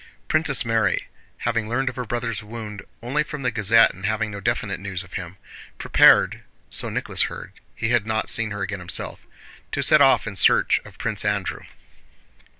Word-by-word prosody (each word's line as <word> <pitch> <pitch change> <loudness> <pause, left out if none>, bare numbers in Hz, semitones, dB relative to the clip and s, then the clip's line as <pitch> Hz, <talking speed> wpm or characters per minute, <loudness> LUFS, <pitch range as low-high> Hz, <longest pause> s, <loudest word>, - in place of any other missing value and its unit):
Princess 155 -5 +2
Mary, 110 -4 0 0.4
having 115 -2 -1
learned 135 +3 -1
of 130 - -2
her 125 -1 -4
brother's 115 0 -3
wound 105 -1 -8 0.2
only 135 +5 0
from 150 -2 -5
the 125 - +1
Gazette 115 +1 +4
and 95 - -14
having 110 +1 -1
no 100 - -6
definite 100 - -2
news 95 -1 -5
of 90 - -17
him, 95 -1 -6 0.4
prepared - - +5 0.3
(so - - 0
Nicholas - - +1
heard, - - -9 0.2
he 115 - -2
had 120 -3 +1
not 110 0 -1
seen 115 -1 0
her 100 -2 -4
again 105 +1 -4
himself) 90 0 -6 0.4
to - - -1
set 155 - +6
off 135 -1 +5
in 105 -2 -6
search - - +4
of - - -14
Prince - - -2
Andrew. - - -2
110 Hz, 180 wpm, -23 LUFS, 100-120 Hz, 0.4 s, set